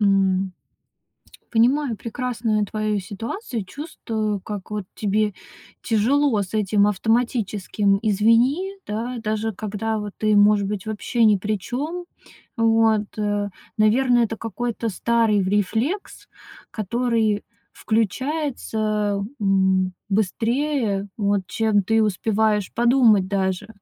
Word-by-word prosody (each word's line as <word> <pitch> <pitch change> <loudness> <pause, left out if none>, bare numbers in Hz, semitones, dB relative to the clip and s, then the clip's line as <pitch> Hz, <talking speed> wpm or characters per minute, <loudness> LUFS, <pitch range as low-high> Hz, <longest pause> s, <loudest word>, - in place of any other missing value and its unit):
эм 195 -2 +2 1.0
понимаю 245 +1 +2
прекрасную 225 -2 -1
твою 215 -1 -1
ситуацию 225 - -5
и - - -6
чувствую, 220 - -4
как 205 0 -7
вот 210 -2 -3
тебе 210 -1 0 0.5
тяжело 235 +1 +2
с 190 +3 -8
этим 205 -1 +3
автоматическим 210 -2 +1
"извини", 230 - +3
да. 230 +4 -3
Даже 215 +1 -1
когда 215 +2 -3
вот 205 -1 -5
ты, 215 -1 +2
может 205 -1 +5
быть, 205 -1 -4
вообще 220 +2 0
ни 210 -2 +5
при 210 +2 -2
чём. 315 - -4 0.5
Вот, 225 -2 +3
э 205 -1 -1 0.3
наверное, 240 +3 +4
это 225 0 -4
какой-то 230 +1 -3
старый 220 0 +2
рефлекс, 220 - -1 0.4
который 225 -1 0 0.3
включается, 220 -3 -1 0.2
м, 190 -1 +2 0.2
быстрее, 220 +1 0
вот, 200 -2 +1
чем 215 -2 +1
ты 225 +3 +2
успеваешь 210 0 +1
подумать 235 -5 +4
даже. 190 0 -1
215 Hz, 110 wpm, -22 LUFS, 205-235 Hz, 1.0 s, может